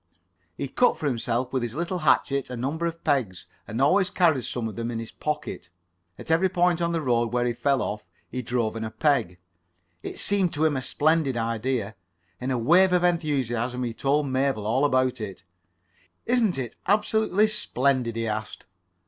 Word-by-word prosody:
He 140 Hz, -, -3 dB
cut 245 Hz, -, +2 dB
for -, -, -5 dB
himself 125 Hz, -1 st, -1 dB
with 130 Hz, -, +1 dB
his 120 Hz, 0 st, -4 dB
little 175 Hz, +3 st, -2 dB
hatchet 140 Hz, -3 st, +2 dB
a 125 Hz, -, -5 dB
number 150 Hz, +8 st, -2 dB
of 165 Hz, 0 st, -6 dB
pegs, 125 Hz, -, 0 dB, 0.2 s
and 110 Hz, -, -4 dB
always 185 Hz, +8 st, +3 dB
carried 160 Hz, -, +2 dB
some 120 Hz, -2 st, -3 dB
of 110 Hz, -, -7 dB
them 115 Hz, +2 st, -3 dB
in 120 Hz, -, -3 dB
his 115 Hz, 0 st, -6 dB
pocket. 150 Hz, -11 st, -4 dB, 0.5 s
At -, -, -6 dB
every 175 Hz, +4 st, +3 dB
point 175 Hz, -1 st, +2 dB
on 170 Hz, 0 st, +1 dB
the 165 Hz, -2 st, -1 dB
road 120 Hz, -3 st, +1 dB
where 120 Hz, 0 st, +1 dB
he 120 Hz, -, 0 dB
fell 135 Hz, +3 st, +1 dB
off, 105 Hz, -3 st, -5 dB, 0.2 s
he 125 Hz, -, -4 dB
drove 115 Hz, -2 st, -1 dB
in 115 Hz, -, -4 dB
a 110 Hz, -, -3 dB
peg. 110 Hz, -, +1 dB, 0.6 s
It -, -, -6 dB
[Pg -, -, -16 dB
15]seemed 195 Hz, -4 st, +2 dB
to 155 Hz, +1 st, +1 dB
him 155 Hz, -2 st, +2 dB
a 130 Hz, -, -1 dB
splendid 150 Hz, -2 st, +1 dB
idea. 115 Hz, -1 st, -2 dB, 0.4 s
In 125 Hz, -, -3 dB
a 130 Hz, -, 0 dB
wave 180 Hz, +10 st, +4 dB
of 180 Hz, -1 st, +3 dB
enthusiasm 130 Hz, -8 st, 0 dB
he 120 Hz, -2 st, -3 dB
told 145 Hz, +5 st, +1 dB
Mabel 130 Hz, -5 st, 0 dB
all 130 Hz, +6 st, +2 dB
about 130 Hz, -3 st, +1 dB
it. 100 Hz, -3 st, -7 dB, 0.8 s
"Isn't 230 Hz, -, +2 dB
it 125 Hz, -4 st, -4 dB
absolutely 210 Hz, 0 st, +3 dB
splendid?" 130 Hz, -, 0 dB
he 115 Hz, 0 st, -2 dB
asked. 110 Hz, 0 st, -4 dB
130 Hz, 190 wpm, -25 LUFS, 115-165 Hz, 0.8 s, wave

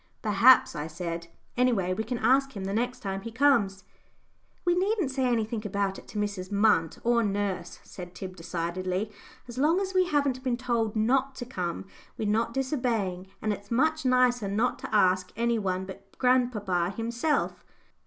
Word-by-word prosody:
"Perhaps," 225 Hz, +4 st, +5 dB
I 150 Hz, +1 st, -3 dB
said; 170 Hz, +1 st, -5 dB, 0.3 s
"anyway 230 Hz, -8 st, +2 dB
we 220 Hz, -, -2 dB
can 235 Hz, +3 st, -3 dB
ask 265 Hz, +2 st, +2 dB
him 195 Hz, -, -4 dB
the 195 Hz, +1 st, -3 dB
next 245 Hz, +3 st, -1 dB
time 195 Hz, -1 st, -3 dB
he 230 Hz, -, -7 dB
comes." 225 Hz, -7 st, +2 dB, 0.8 s
"We 350 Hz, -, +4 dB
needn't 375 Hz, -4 st, +1 dB
say 265 Hz, -1 st, 0 dB
anything 225 Hz, -2 st, 0 dB
about 200 Hz, -1 st, -1 dB
it -, -, -17 dB
to -, -, -8 dB
Mrs. 200 Hz, -3 st, -2 dB
Munt, 200 Hz, -6 st, +2 dB
or 235 Hz, 0 st, +3 dB
nurse," 205 Hz, -2 st, -2 dB
said 180 Hz, -1 st, -10 dB
Tib, 185 Hz, -1 st, -7 dB
decidedly. 180 Hz, +4 st, -3 dB, 0.4 s
"As 240 Hz, +1 st, -7 dB
long 315 Hz, +6 st, +3 dB
as 385 Hz, -1 st, -3 dB
we 370 Hz, -1 st, +3 dB
haven't 280 Hz, -5 st, 0 dB
been 250 Hz, -2 st, 0 dB
told 235 Hz, -3 st, -1 dB
not 260 Hz, +5 st, +1 dB
to 245 Hz, -, -6 dB
come, 180 Hz, -9 st, -4 dB, 0.3 s
we're 215 Hz, -, -2 dB
not 220 Hz, +3 st, +1 dB
disobeying, 230 Hz, -9 st, -1 dB, 0.2 s
and 215 Hz, -1 st, +1 dB
it's 200 Hz, 0 st, -10 dB
much 315 Hz, +6 st, +1 dB
nicer 250 Hz, -4 st, +3 dB
not 215 Hz, +5 st, 0 dB
to -, -, -6 dB
ask 185 Hz, -2 st, +3 dB
any 235 Hz, +1 st, +1 dB
one 190 Hz, -2 st, -1 dB
but 195 Hz, +1 st, -12 dB
grandpapa 210 Hz, -8 st, +1 dB
himself." 235 Hz, +7 st, -1 dB
220 Hz, 175 wpm, -28 LUFS, 195-255 Hz, 0.8 s, Perhaps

